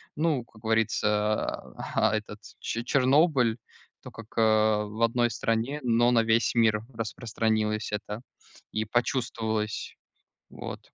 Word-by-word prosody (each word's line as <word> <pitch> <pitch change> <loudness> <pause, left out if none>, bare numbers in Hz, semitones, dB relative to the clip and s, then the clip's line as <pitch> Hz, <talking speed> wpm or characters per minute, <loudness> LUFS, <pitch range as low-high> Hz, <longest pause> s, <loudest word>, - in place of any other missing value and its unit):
ну, 155 -5 +1
как 110 -2 -20
говорится, 105 -1 0 0.2
а, 110 0 +3
этот, 105 -1 -5 0.2
че 115 - -3
Чернобыль, 130 -2 +3 0.5
то, - - -9
как, 115 -1 -11
э, - - +4
в 110 0 +2
одной 120 +1 +2
стране, 120 +4 -1
но 120 0 +3
на 115 -2 +4
весь 115 +1 +2
мир 110 -2 +3
распространилось 110 -1 -1
это, 105 +1 -4 0.5
и 110 0 -1
почувствовалось, 110 -2 -1 0.5
вот. - - -7
115 Hz, 120 wpm, -27 LUFS, 110-120 Hz, 0.5 s, э